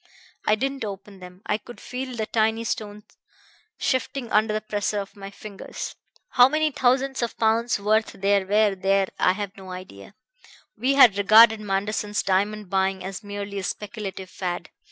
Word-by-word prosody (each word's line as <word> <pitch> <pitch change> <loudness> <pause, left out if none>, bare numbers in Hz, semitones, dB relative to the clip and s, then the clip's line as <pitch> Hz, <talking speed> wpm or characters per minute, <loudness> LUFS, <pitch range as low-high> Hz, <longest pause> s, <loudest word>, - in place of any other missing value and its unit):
I 215 - +5
didn't 270 +3 -2
open 200 -1 -7
them; 180 +2 -13
I 210 - 0
could 240 - -12
feel 255 0 -6
the 220 -2 -2
tiny 220 +1 +1
stones 210 -3 -4 0.7
shifting 260 -2 -1
under 215 +1 +3
the 215 - 0
pressure 210 -1 -2
of 200 +1 -7
my 195 -1 -8
fingers. 200 0 -8 0.4
How 250 0 +6
many 310 +1 +1
thousands 265 +1 +1
of 235 - -3
pounds' 225 0 +2
worth 215 +2 +1
there 195 0 +1
were 210 0 +3
there 195 0 +1
I 180 - +4
have 200 -1 -5
no 190 -1 -11
idea. 185 - -10 0.6
We 255 +5 +1
had 235 -8 +7
regarded 220 +2 +7
Manderson's 205 +1 -1
diamond 205 +2 0
buying 190 0 0
as 195 +3 -6
merely 205 0 -5
a - - -5
speculative 195 -2 -5
fad. 175 -3 -4
210 Hz, 165 wpm, -24 LUFS, 195-225 Hz, 0.7 s, had